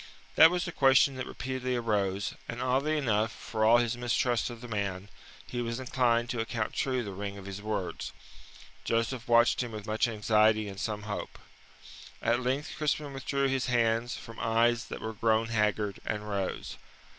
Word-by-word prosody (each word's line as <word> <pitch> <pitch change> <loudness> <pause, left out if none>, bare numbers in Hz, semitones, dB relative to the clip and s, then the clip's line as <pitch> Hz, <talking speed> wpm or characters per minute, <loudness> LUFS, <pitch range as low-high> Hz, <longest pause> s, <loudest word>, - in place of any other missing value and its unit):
That 160 - +9
was 180 0 -1
the 175 - -4
question 135 -2 +5
that 130 - -4
repeatedly 130 0 -3
arose, 100 -4 0 0.2
and 115 - -4
oddly 135 +5 +1
enough, 110 -5 +1
for 110 -1 -3
all 115 +2 +7
his 120 -1 +1
mistrust 120 0 0
of 120 -1 -8
the 120 - -8
man, 100 -3 -3 0.4
he 120 - -4
was 115 +1 -3
inclined 120 -2 +1
to 120 - -3
account 115 -1 -2
true 130 -2 0
the 100 - -5
ring 100 +1 -5
of 100 - -10
his 100 +1 -6
words. 105 -3 -3 0.7
Joseph 115 +1 -1
watched 120 +1 +4
him 120 -2 -4
with 105 -1 -6
much 110 +2 +1
anxiety 110 -1 +3
and 100 -1 -7
some 105 -1 -3
hope. 105 -1 -5 0.8
At 120 +1 +1
length 130 +4 -1
Crispin 150 -1 -1
withdrew 140 +1 0
his 135 -1 0
hands 115 -1 +1
from 115 - -10
eyes 115 +1 +2
that - - -7
were 110 0 -4
grown 110 +1 +1
haggard, 105 -2 0
and 105 0 -3
rose. 100 -2 -3
115 Hz, 180 wpm, -29 LUFS, 105-125 Hz, 0.8 s, That